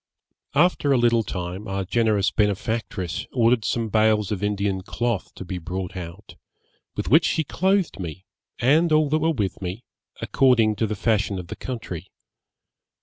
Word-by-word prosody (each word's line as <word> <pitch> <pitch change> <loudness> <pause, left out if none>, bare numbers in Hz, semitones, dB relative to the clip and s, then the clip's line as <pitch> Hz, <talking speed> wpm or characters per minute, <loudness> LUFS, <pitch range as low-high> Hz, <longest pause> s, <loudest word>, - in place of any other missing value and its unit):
'After 150 -2 +3
a 135 - +5
little 120 -1 +3
time 90 0 -5
our 95 0 -2
generous 105 -1 +2
benefactress 105 -3 -1
ordered 120 -2 +3
some 115 +1 -1
bales 110 -1 +2
of 100 -3 -2
Indian 100 -2 -1
cloth 115 +2 -2
to 95 - -8
be 90 0 -4
brought 90 +2 -5
out, 90 +3 -8 0.6
with - - -3
which 160 +4 +6
she 160 - +1
clothed 190 - 0
me, 90 +1 -6 0.3
and 155 +7 +3
all 155 -1 +4
that 155 +2 +2
were 160 +1 +1
with 105 -13 -2
me, 95 +6 -5 0.4
according 115 -5 +3
to 110 - +1
the 110 - -3
fashion 105 -1 0
of 90 -2 -7
the - - -5
country. 105 -9 -6
110 Hz, 160 wpm, -24 LUFS, 95-125 Hz, 0.6 s, which